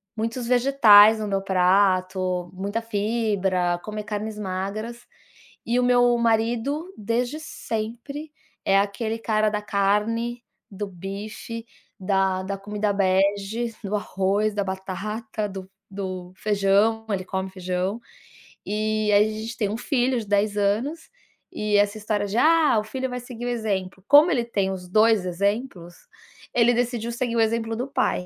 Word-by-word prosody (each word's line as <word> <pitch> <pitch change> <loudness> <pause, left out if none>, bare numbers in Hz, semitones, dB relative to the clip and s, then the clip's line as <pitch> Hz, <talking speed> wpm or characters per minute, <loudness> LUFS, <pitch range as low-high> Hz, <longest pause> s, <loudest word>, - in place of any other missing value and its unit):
muitos 230 +2 -3
vegetais 230 -4 +6
no 215 - -3
meu 195 -1 0
prato, 185 -1 +1
muita 200 +4 -3
fibra, 200 -5 0
comer 215 0 -5
carnes 210 +1 -4
magras 210 +5 -4 0.6
e 240 +2 +1
o - - +2
meu 245 -1 +4
marido, 235 +9 0
desde 240 +7 -1
sempre, 245 +2 -5 0.3
é 195 - +4
aquele 220 +3 -2
cara 215 -1 +1
da 210 0 -2
carne, 215 +4 0 0.3
do 205 +1 -4
bife, 200 +5 -7 0.3
da 190 -1 +1
da 195 +1 -4
comida 205 +1 -2
bege, 200 +4 +1
do 205 +1 -2
arroz, 205 +1 0
da 205 -1 0
batata, 210 +3 -4
do 190 -1 -8 0.2
do 185 -2 -6
feijão, 205 +2 +2
ele 195 -3 -1
come 190 0 -3
feijão. 185 +3 -2 0.7
E 215 0 0
aí 205 +1 +6
a - - -5
gente 230 +2 -6
tem 210 -3 0
um 215 - -3
filho 250 0 0
de 220 - -6
10 205 +1 +1
anos 230 +11 -1 0.4
e 210 -1 0
essa 205 +1 +2
história 210 -1 -1
de: 200 +3 -3
"Ah, 315 -2 +4
o - - -3
filho 260 +4 -3
vai 250 0 -4
seguir 245 -1 -8
o - - -1
exemplo". 195 -5 -3
Como 295 +4 +7
ele 245 -7 +1
tem 200 -5 -1
os 180 -1 -6
2 215 0 +4
exemplos, 185 -1 -2 0.6
ele 240 0 +4
decidiu 240 -1 -1
seguir 235 0 -2
o - - +4
exemplo 225 0 0
do 250 +4 -3
pai. 225 -8 0
210 Hz, 150 wpm, -24 LUFS, 195-230 Hz, 0.7 s, Como